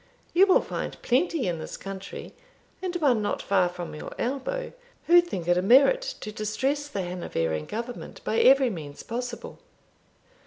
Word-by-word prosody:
You 380 +3 +6
will 375 - +5
find - - -5
plenty 280 - +1
in 170 -2 -2
this - - -7
country, 195 0 -8 0.5
and 365 -1 -3
one 275 -10 +3
not 205 - -1
far 185 -3 +2
from 175 -1 -7
your 150 - -7
elbow, 280 - -3 0.3
who 350 +1 +7
think 190 - -5
it 175 0 +4
a - - +1
merit 275 - +6 0.2
to 215 - -5
distress 265 +8 -1
the 200 -10 -3
Hanoverian 80 - -2
government 235 +2 -6
by 225 - 0
every 265 -1 +6
means 150 -6 -8
possible." 240 0 -6
235 Hz, 160 wpm, -26 LUFS, 180-285 Hz, 0.5 s, who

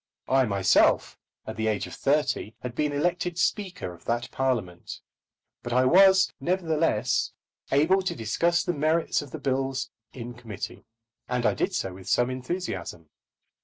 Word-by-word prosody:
I 130 0 +4
myself, 100 -2 +3 0.3
at 110 - -6
the 110 0 0
age 105 -2 0
of - - -10
thirty, 140 -6 0
had 125 -2 -5
been 150 +3 0
elected 175 +3 -1
Speaker 180 - -1
of 85 - -16
that 120 +1 -2
Parliament. 115 -10 -2 0.6
But 120 - -4
I 130 +1 +4
was, 190 +5 +6
nevertheless, 160 - 0 0.4
able 155 +8 +4
to 185 - -2
discuss 170 +11 +1
the 175 - -1
merits 155 +2 +1
of 145 - -9
the 160 - -6
bills 135 -2 -1 0.2
in 120 -1 -7
committee, 115 -3 -7 0.4
and 125 -1 0
I - - +4
did - - -1
so 95 - -2
with 95 0 -10
some 120 +1 +2
enthusiasm. 125 - -5
130 Hz, 155 wpm, -26 LUFS, 115-165 Hz, 0.6 s, was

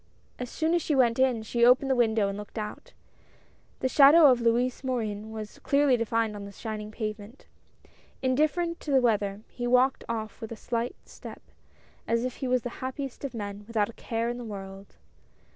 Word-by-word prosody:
As 250 -1 -4
soon 320 +5 0
as 345 - +2
she 300 - 0
went 245 -2 +3
in 255 -4 +2
she 235 +2 0
opened 250 +3 +6
the - - +3
window 220 -4 +2
and 200 - -3
looked 210 +2 -9
out. 210 -1 -6 0.9
The 260 - +2
shadow 290 +2 +7
of 245 -1 +1
Louis 240 +3 +1
Morin 220 -5 -3
was 215 -1 -8
clearly 280 -2 +3
defined 230 -2 0
on 200 -1 -7
the 200 - -9
shining 215 +1 -6
pavement. 215 +2 -6 0.7
Indifferent 310 +6 0
to - - -9
the 270 -2 +5
weather, 210 -4 0
he 245 -1 -5
walked 255 +2 +3
off 220 -2 -4
with 225 - -6
a 230 +2 -9
light 235 +1 -1
step, - - -11 0.6
as 230 +1 +1
if 255 - -4
he 265 - -3
was 255 -1 +1
the 245 - -3
happiest 260 +1 -5
of 275 -3 -5
men, 205 -1 -6
without 220 -2 0
a - - -9
care 230 +1 -3
in 240 +1 -3
the - - -6
world. 195 -2 -9
235 Hz, 195 wpm, -27 LUFS, 215-260 Hz, 0.9 s, shadow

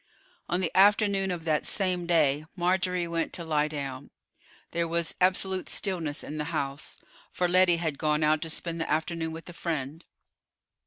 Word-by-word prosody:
On 175 +2 +1
the 170 -3 -2
afternoon 200 0 +4
of 175 -3 -4
that 155 -2 +1
same 180 -3 -1
day 155 -3 +3
Marjorie 180 -1 +1
went 165 -1 -2
to 170 - -3
lie 155 -2 +1
down. 140 -4 -6 0.6
There 170 0 -1
was 170 0 -1
absolute 190 0 +3
stillness 170 -7 -2
in 155 +1 -6
the 150 - -2
house, 145 -3 -3 0.3
for 180 - 0
Lettie 180 -1 +5
had 160 -4 -2
gone 150 0 +1
out 155 0 +3
to 165 - -4
spend 165 +1 -2
the - - -3
afternoon 160 +1 -1
with 165 +1 -9
a 175 - -9
friend. 160 -2 -4
165 Hz, 170 wpm, -28 LUFS, 155-180 Hz, 0.6 s, Lettie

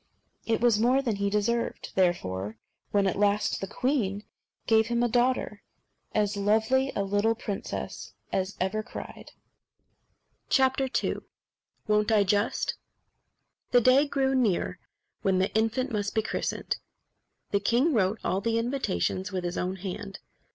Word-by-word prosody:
It 225 -1 +1
was 235 -3 +4
more 255 +4 +3
than 230 -6 -1
he 200 0 0
deserved, 210 +3 -1
therefore, 105 - 0 0.3
when, 200 -1 +2
at 195 0 0
last, 205 0 +2
the 195 - -3
queen 210 -5 -1 0.4
gave 220 -1 +4
him 235 0 +1
a - - +3
daughter 240 -3 +1 0.5
as 210 -1 +1
lovely 220 +7 +2
a 200 - +1
little 205 +3 +1
princess 210 -3 -5 0.2
as 190 +1 -1
ever 190 +4 0
cried. - - -9 1.3
II 265 0 +1 0.7
Won't 210 0 +2
I, 210 -2 +5
Just? 205 +3 0 0.9
The 245 - +5
day 260 +5 +5
drew 270 -1 +1
near 205 -7 +1 0.4
when 190 -1 +2
the 190 +1 0
infant 225 +4 +1
must 205 -1 -2
be 220 - +2
christened. - - -2 0.7
The 200 - +3
king 240 +10 +2
wrote 205 -2 +2
all 190 - 0
the 230 +2 0
invitations 230 - -1
with 185 -2 -3
his 175 0 -3
own 185 +1 -2
hand. 195 +1 -6
210 Hz, 140 wpm, -28 LUFS, 195-240 Hz, 1.3 s, I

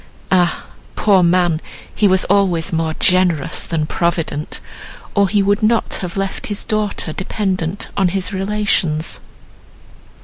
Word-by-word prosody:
Ah! 180 -2 +2 0.3
poor 200 -3 +4
man, 175 -2 +2 0.3
he 210 - +3
was 190 -1 +3
always 180 -4 +2
more 160 -1 0
generous 180 -5 +2
than 160 -2 -1
provident, 165 -2 -2 0.5
or 200 -2 +3
he 200 +1 +2
would 205 +2 +1
not 225 +1 +2
have 180 0 -5
left 195 0 -3
his 205 -1 -3
daughter 210 -6 -1
dependent 190 -1 -2
on 195 - +2
his 190 +2 -1
relations." 190 -5 0
185 Hz, 130 wpm, -18 LUFS, 170-200 Hz, 0.5 s, poor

